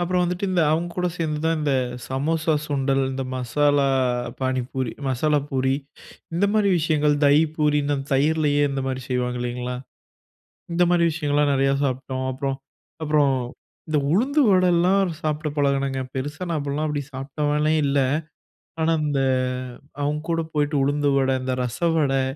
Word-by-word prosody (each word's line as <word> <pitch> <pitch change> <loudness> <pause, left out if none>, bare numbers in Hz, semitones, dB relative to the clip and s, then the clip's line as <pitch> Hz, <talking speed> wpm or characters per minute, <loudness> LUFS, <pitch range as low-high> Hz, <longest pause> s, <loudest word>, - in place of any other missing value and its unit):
அப்புறம் 180 +1 +1
வந்துட்டு, 180 +2 -1
இந்த 180 -2 +2
அவங்கக்கூட 175 +2 -1
சேர்ந்து 155 -2 -1
தான் 165 0 +2
இந்த 150 -2 0 0.4
சமோசா, 155 +4 0
சுண்டல் 135 -1 0
இந்த 135 - -3
மசாலா 140 +3 +2 0.5
பானிபூரி, 130 -1 -2 0.2
மசாலா 150 +4 +1
பூரி 130 -1 +1 0.6
இந்தமாரி 200 +3 +2
விஷயங்கள், 150 -2 +2
தஹி 145 +2 +6
பூரின்னு 150 -1 +1
அந்த 135 0 -5
தயிரிலேயே 145 +1 +2
இந்தமாரி 135 -1 -2
செய்வாங்க 125 -1 -1
இல்லைங்களா? 125 +1 -3 1.0
இந்தமாரி 175 0 +3
விஷயங்கள்லாம் 145 -2 +1
நெறையா 135 0 +2
சாப்பிட்டோம். 130 0 -2
அப்புறம், 135 +1 -2 0.5
அப்புறம் 150 -3 +3 0.5
இந்த 155 -1 +1
உளுந்து 270 - +2
வடல்லாம் 185 0 +3
சாப்பிட 155 0 -2
பழகினங்க. 140 -1 +1
பெருசா 145 +6 -4
நான் 165 - -1
அப்பிட்லாம் 145 +2 -2
அப்படி 145 -1 -2
சாப்பிட்டவனே 150 +3 0
இல்ல. 140 0 +1 0.8
ஆனா, 165 +1 +3
இந்த 140 -2 0 0.8
அவுங்ககூட 155 +3 -1
போயிட்டு 145 0 +1
உளுந்து 145 +1 +1
வட, 135 -1 +2
இந்த 130 - -1
ரசவடை 140 +1 +1
145 Hz, 130 wpm, -23 LUFS, 135-160 Hz, 1.0 s, தஹி